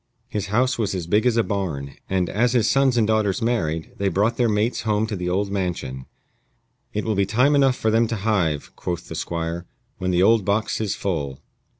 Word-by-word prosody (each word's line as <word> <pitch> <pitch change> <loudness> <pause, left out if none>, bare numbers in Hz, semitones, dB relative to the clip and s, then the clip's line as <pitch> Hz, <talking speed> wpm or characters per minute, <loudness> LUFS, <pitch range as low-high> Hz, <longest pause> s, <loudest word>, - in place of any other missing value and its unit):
His 100 -2 -3
house 125 +5 +1
was 100 -3 0
as 90 -3 -3
big 105 +8 +2
as 120 -2 +2
a 115 - +4
barn, 80 -11 -3 0.2
and, 95 -2 +1
as 120 +6 +1
his 115 -3 +3
sons 135 -2 +3
and 115 - +4
daughters 105 -3 +1
married, 85 -9 -1
they 100 - 0
brought 105 +6 +1
their 120 -2 +2
mates 105 +3 0
home 105 -1 +1
to 110 -1 -4
the 90 -1 -3
old 100 +2 0
mansion. 85 -9 -3 0.8
"It 105 - -3
will 110 - +1
be 100 -1 +1
time 125 +8 +3
enough 135 -3 +4
for 110 - 0
them 115 +1 +3
to 115 - -2
hive," 95 -8 -1
quoth 85 -1 -4
the - - -5
Squire, 85 +1 -3 0.3
"when 90 - -1
the 90 0 +3
old 110 +1 +5
box 105 +3 0
is 105 -2 -1
full." 70 -9 -3
105 Hz, 215 wpm, -23 LUFS, 90-115 Hz, 0.8 s, old